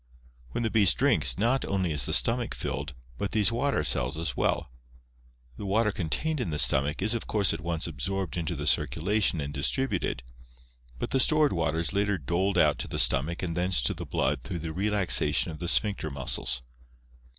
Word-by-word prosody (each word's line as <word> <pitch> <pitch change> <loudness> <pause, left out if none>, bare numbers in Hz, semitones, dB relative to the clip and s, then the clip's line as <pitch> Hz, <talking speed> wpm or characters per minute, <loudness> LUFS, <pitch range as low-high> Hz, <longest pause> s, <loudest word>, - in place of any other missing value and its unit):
When 90 - -3
the 110 - -1
beast 100 - +4
drinks, - - +3
not 120 +6 +1
only 95 -4 -1
is 75 -5 -1
the - - -3
stomach 120 0 +2
filled, 75 -1 -4 0.2
but 100 - -3
these 110 +1 +2
water 135 +4 0
cells 65 +5 0
as 80 -6 -3
well. - - -1 0.9
The - - -7
water 105 +2 +2
contained 140 - -2
in 120 - -2
the 75 - -3
stomach 75 +5 +1
is 110 +3 +2
of 115 - -4
course 105 -3 +1
at 80 - -5
once 85 -1 -2
absorbed 90 +4 -3
into 85 0 -3
the 75 -1 -5
circulation 100 +3 +2
and 70 0 -4
distributed, 85 - -1 0.7
but - - -5
the 135 - +2
stored 155 +2 +3
water 80 -2 -1
is 85 +2 -2
later 100 0 0
doled 85 +6 -1
out - - +3
to - - -4
the - - -5
stomach 85 +7 +1
and 85 -2 -3
thence 90 -1 +1
to - - +1
the - - -8
blood 70 0 -1
through 70 +8 -5
the 80 - -4
relaxation 100 -2 +2
of 75 - -9
the 85 - -4
sphincter 100 -3 +2
muscles. 65 -2 -2
90 Hz, 195 wpm, -27 LUFS, 75-105 Hz, 0.9 s, beast